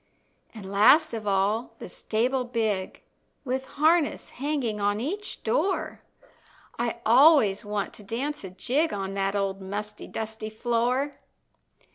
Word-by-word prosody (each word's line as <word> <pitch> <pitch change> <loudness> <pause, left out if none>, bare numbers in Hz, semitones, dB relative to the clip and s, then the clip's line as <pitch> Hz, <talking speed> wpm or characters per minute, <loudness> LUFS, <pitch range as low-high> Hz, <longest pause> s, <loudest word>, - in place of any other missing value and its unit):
An' 215 - -8
last 210 +11 +5
of 220 -2 -5
all 205 +4 0
the - - -8
stable 250 +4 -1
big, 220 -6 -2 0.4
With 260 +1 -2
harness 315 +1 +2
hanging 260 -6 -2
on 205 +1 +1
each 395 - -4
door, 400 -6 -1 0.8
I 235 0 -2
always 240 -4 +6
want 205 -1 -3
to 210 - -12
dance 265 +8 -3
a 190 - -6
jig 260 - 0
On 195 -1 -3
that 195 0 -1
old 195 -1 -1
musty, 205 +2 -6
dusty 220 0 -5
floor. 245 +5 -1
225 Hz, 130 wpm, -26 LUFS, 205-270 Hz, 0.8 s, always